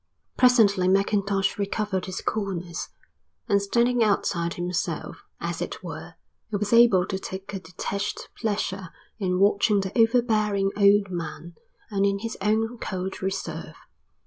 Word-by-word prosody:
Presently 215 -7 +5
Mackintosh 195 +1 +1
recovered 200 -2 -1
his 185 - -4
coolness, 180 -5 -3 0.6
and 200 0 +3
standing 235 +4 +2
outside 170 -5 0
himself, 175 0 -3 0.2
as - - -4
it - - -5
were, - - -8 0.3
he 215 - -3
was 205 +2 -1
able 230 -6 +6
to 190 0 -3
take 190 +1 -7
a 195 - -3
detached 200 +3 -4
pleasure 200 -4 -2 0.3
in 180 -3 0
watching 200 +1 +4
the 190 0 -5
overbearing 220 -4 +2
old 200 -1 +4
man 170 0 -5 0.4
and 200 -1 +1
in 200 0 +2
his 225 +3 -5
own 225 +3 0
cold 185 0 -4
reserve. 190 0 -4
200 Hz, 135 wpm, -25 LUFS, 190-215 Hz, 0.6 s, able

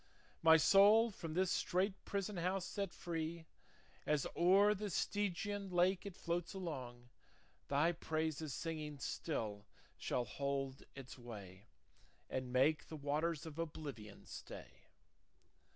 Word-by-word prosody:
My 160 0 +8
soul, 205 +7 +7
from 165 -5 -6
this 185 0 +2
strait 190 +3 +1
prison 200 0 -2
house 180 +2 0
set 200 -2 -3
free, 165 -1 -4 0.6
As 150 -3 +2
o'er 195 +4 +6
the 210 0 -4
Stygian 205 +2 -1
lake 185 +2 +2
it 195 - -7
floats 170 +1 -2
along, 125 -9 -6 0.6
Thy 145 +4 +3
praises 160 -2 -2
singing 155 -1 -4
still 110 -8 -3 0.3
shall 125 - -1
hold 135 +2 -2
its 135 -1 -9
way, 105 -4 -10 0.6
And 130 -1 -2
make 135 +5 +3
the 160 - -7
waters 155 +3 -1
of 160 0 -8
oblivion 140 -10 -6
stay. - - -10
160 Hz, 120 wpm, -38 LUFS, 140-185 Hz, 0.6 s, My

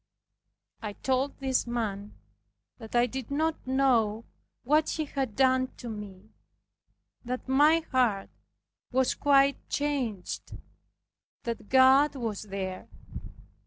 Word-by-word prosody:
I 210 -2 -5
told 265 +5 -1
this 265 -2 0
man, 210 -4 -3 0.6
that 225 0 -9
I 240 0 +5
did 255 0 -6
not 310 0 -1
know 235 -5 +2 0.4
what 300 +4 +2
he 315 - -2
had 270 -6 -3
done 260 -1 +3
to 240 - -7
me, 210 -1 -9 0.9
that 250 +1 -5
my 295 +5 +4
heart 235 -7 +1 0.6
was 260 0 +2
quite 280 -1 +3
changed, 260 -10 -3 0.9
that 230 -3 -5
God 265 +3 +5
was 225 -6 -3
there. 190 -2 -5
255 Hz, 110 wpm, -28 LUFS, 220-275 Hz, 0.9 s, I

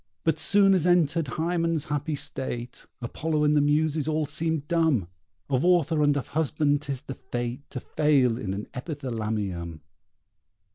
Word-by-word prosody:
But 160 - +1
soon 200 -1 +5
as 180 -2 +2
entered 165 -3 +3
Hymen's 165 +1 -1
happy 145 +1 -2
state 130 -4 -5 0.2
Apollo 155 +5 -1
and 150 0 +3
the 145 - +4
Muses 150 +1 +1
all 155 0 0
seem 160 +1 -1
dumb. 160 - +1 0.4
Of 135 -1 0
author 170 -3 +3
and 145 -1 +3
of 140 - -4
husband 150 -1 +1
'tis 140 -3 -4
the 135 - -7
fate 120 +1 -5
To 130 - -5
fail 135 -4 +2
in 95 -6 -3
an 105 - -5
Epithalamium! 110 - -4
145 Hz, 150 wpm, -26 LUFS, 125-160 Hz, 0.4 s, soon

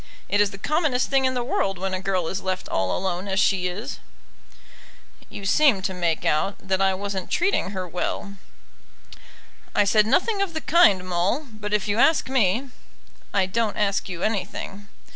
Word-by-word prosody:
It 205 - +2
is 205 - +3
the 195 - -10
commonest 290 - 0
thing 270 -1 +3
in 260 0 +1
the 245 - -1
world 195 -5 -1
when 190 +1 -3
a 185 - -1
girl 185 -3 -1
is 190 +3 -3
left 185 -1 -3
all 95 -1 0
alone 185 0 -3
as 195 0 0
she 190 -2 +2
is." 210 +10 -5 1.3
"You 200 - -8
seemed 210 -3 +3
to 190 - -1
make 170 -3 -1
out 155 +6 +1
that 190 0 -2
I 190 -1 +3
wasn't 195 -1 -4
treating 360 - +1
her 185 -2 -4
well." 195 +3 -4 1.4
"I 205 - +5
said 210 +1 +3
nothing 395 - +2
of 370 -5 -2
the 315 - -2
kind, 205 - +4
Maule; 185 - 0
but 210 -1 -6
if 210 -1 0
you 205 +2 0
ask 315 0 +3
me 250 +1 +1 0.3
" - - -32 0.3
"I 195 -2 +2
don't 215 +2 -1
ask 200 -1 0
you 175 -2 -5
anything." 200 -1 -3
200 Hz, 185 wpm, -24 LUFS, 185-240 Hz, 1.4 s, I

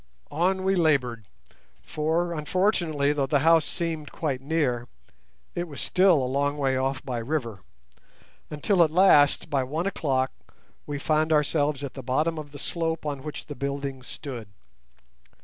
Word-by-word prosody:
On 185 +4 +1
we 190 +1 +2
laboured, 130 - +1 0.6
for, 165 - -1
unfortunately, 155 -3 +1
though 140 -2 0
the 145 -2 +2
house 165 -1 +5
seemed 165 -4 -4
quite 140 -5 -2
near, 135 -5 0 0.7
it 175 0 -3
was 145 -4 -9
still 180 -7 +3
a - - 0
long 140 +3 0
way 135 -2 +1
off 135 0 -1
by 125 -3 -2
river, 115 -5 -3 0.9
until 175 +5 +1
at 160 - +2
last, 155 -4 +4
by 135 -2 +2
one 155 +7 -3
o'clock, 135 -9 0 0.6
we 145 - -3
found 155 +2 +1
ourselves 150 -1 +1
at 140 - -5
the 135 - -7
bottom 155 +6 0
of 150 -1 -8
the 145 - -10
slope 165 +1 -3
on 145 -2 -3
which 150 +1 -7
the 145 - -7
building 140 -1 -4
stood. 125 -3 -7
145 Hz, 155 wpm, -26 LUFS, 135-165 Hz, 0.9 s, house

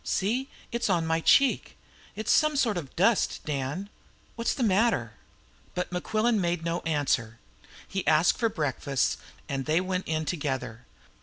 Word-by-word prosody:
"See, 245 +8 -1 0.2
it's 235 -2 -1
on 170 -3 +2
my 160 0 +1
cheek! 275 - +3 0.4
It 215 +2 -5
is - - +2
some 305 -1 +3
sort 235 -7 +2
of 155 -7 -6
dust, 205 +5 +2
Dan. 145 +6 -3 0.5
What's 230 0 -1
the 265 - -1
matter?" 195 - +2 0.6
But 180 0 -2
Mequillen 215 +5 +1
made 170 -1 -1
no 170 +1 0
answer. 135 -7 0 0.5
He 195 -1 -4
asked 160 +2 +4
for 230 -2 +2
breakfast, 140 - -1 0.3
and 135 0 -3
they 155 +2 +3
went 185 0 -2
in 155 0 -1
together. 130 -7 -3
175 Hz, 155 wpm, -27 LUFS, 145-215 Hz, 0.6 s, asked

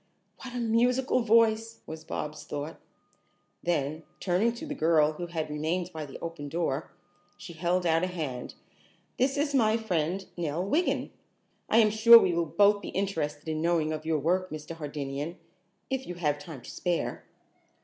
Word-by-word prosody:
"What 250 -2 -8
a - - -2
musical 245 +3 +2
voice!" 225 -1 +3
was 160 0 -8
Bobs' 150 -1 -5
thought. 145 +2 -5 0.8
Then, 155 -2 -1 0.2
turning 190 +6 +2
to 240 +7 -7
the 295 - -4
girl 160 - +3
who 175 +3 -6
had 160 -2 -3
remained 160 +4 -2
by 155 -2 -5
the 135 - -9
open 165 -4 -6
door, 160 -2 -2 0.5
she 175 - -9
held 175 +2 0
out 165 0 +3
a - - +2
hand. 150 -9 -5 0.6
"This 270 +3 +2
is 290 0 0
my 225 -4 +4
friend, 185 -3 -1
Nell 170 +1 -2
Wiggin. 310 - 0 0.6
I - - +4
am 215 -2 +6
sure 225 +2 +8
that - - +5
we 175 - +2
will 170 -1 0
both 200 +6 +4
be - - -6
interested 160 -7 -2
in 155 0 -2
knowing 165 -2 +1
of 155 - -5
your 160 -1 +1
work, 180 +5 0
Mr. 155 +1 -7
Hardinian, 145 +1 -5 0.5
if 265 0 -2
you 180 - -5
have 150 -4 0
time 145 -4 -9
to - - -9
spare." 175 -2 -2
170 Hz, 175 wpm, -28 LUFS, 155-220 Hz, 0.8 s, sure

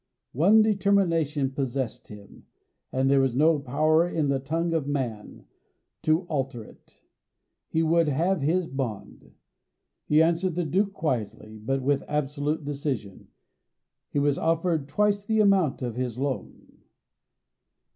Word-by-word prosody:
One 200 - +5
determination 170 -9 +1
possessed 130 -3 -3
him, 105 -2 -14 0.4
and 130 +1 +1
there 140 0 +4
was 130 -3 0
no 155 +2 +4
power 155 +5 +2
in 155 -4 -1
the 135 -1 +1
tongue 165 +5 -2
of 155 -4 -1
man 125 -7 -4 0.6
to 155 +2 +2
alter 135 -8 -3
it - - -20 0.6
he 160 - 0
would 165 0 +3
have 170 +5 0
his 165 +5 +1
bond. 125 -8 -6 0.7
He 150 - +4
answered 170 +1 0
the 175 -1 -1
Duke 195 +6 0
quietly, 110 - -4
but 135 +5 -2
with 140 0 +1
absolute 150 +1 -2
decision. 135 -9 -4 0.8
He - - -4
was 145 -1 +1
offered 165 -2 0
twice 205 +6 +1
the 220 +1 0
amount 190 -10 +3
of 120 -3 -3
his 125 -2 -3
loan. 135 -1 -5
145 Hz, 135 wpm, -26 LUFS, 135-165 Hz, 0.8 s, One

